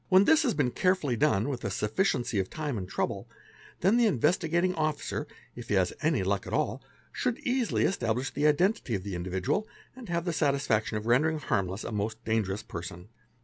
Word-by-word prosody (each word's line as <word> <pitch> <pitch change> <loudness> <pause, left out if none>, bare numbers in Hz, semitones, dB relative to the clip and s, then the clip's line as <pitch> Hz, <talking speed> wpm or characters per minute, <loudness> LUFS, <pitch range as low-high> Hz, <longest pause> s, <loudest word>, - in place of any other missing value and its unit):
When 185 +1 +7
this 320 +5 +5
has 260 -8 +1
been 130 -5 +1
carefully 180 -8 +1
done 120 -5 +2
with 130 -4 -4
a 100 - -1
sufficiency 110 - 0
of 95 - -1
time 150 -4 -3
and 95 -4 -5
trouble, - - -2 0.5
then 195 +7 +4
the 240 -2 +5
Investigating 170 - +2
Officer, 155 -3 -2 0.3
if - - -8
he - - +2
has - - +2
any - - +2
luck - - -1
at - - -5
all, - - 0 0.3
should 250 -2 -1
easily 260 -5 0
establish 125 - 0
the 145 +2 +2
identity 150 - +2
of 95 - -4
the 100 -1 -5
individual 95 - -1 0.3
and 255 -6 -10
have 170 0 -1
the 175 - -1
'satisfaction 140 -8 +1
of 105 - -5
rendering 150 +7 +3
harmless 95 -8 -1
a - - -5
most 110 +2 -3
dangerous 110 -2 0
person. 90 +2 -8
140 Hz, 190 wpm, -29 LUFS, -, 0.5 s, When